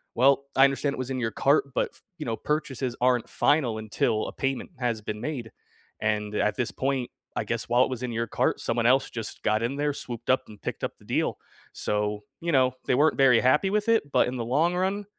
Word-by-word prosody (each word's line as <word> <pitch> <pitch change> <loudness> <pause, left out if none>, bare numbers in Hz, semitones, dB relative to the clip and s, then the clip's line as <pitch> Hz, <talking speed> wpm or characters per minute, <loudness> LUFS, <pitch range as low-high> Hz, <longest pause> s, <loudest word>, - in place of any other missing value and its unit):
"Well, 135 +2 +4
I 135 - +6
understand 140 +1 0
it - - -9
was 130 - -3
in 130 - -2
your 115 -2 -1
cart, 140 +3 +2
but, - - +1
f - - -18 0.2
you 155 - -5
know, 115 -1 -1
purchases 140 -5 -2
aren't 125 -2 +2
final 130 -7 +2
until 110 0 0
a - - -7
payment 135 -1 -2
has 120 -3 -1
been 105 0 -5
made, 125 -8 -4 0.5
and 105 -1 0
at 105 0 +1
this 125 -3 -1
point, 135 -2 -1 0.3
I - - +1
guess, - - -3
while 120 +2 +4
it - - -1
was 130 -2 -4
in 125 - -2
your 115 +1 -1
cart, - - 0
someone 115 0 0
else 130 +2 +4
just 115 -2 -7
got 110 +1 +2
in 125 +4 -1
there, 145 +1 0
swooped 120 -3 -7
up, 130 - +2
and 105 -1 -14
picked - - -5
up - - -3
the - - -20
deal." - - 0 0.4
So, 105 0 -1 0.2
you 170 - -1
know, 130 -3 +3
they - - +2
weren't 155 +4 +3
very 135 -4 +6
happy 150 +9 +3
with 210 +1 0
it, 220 -11 +2
but - - +4
in 125 - -3
the 115 - -3
long 155 +9 +2
run, 195 +3 -1
130 Hz, 235 wpm, -26 LUFS, 115-140 Hz, 0.5 s, I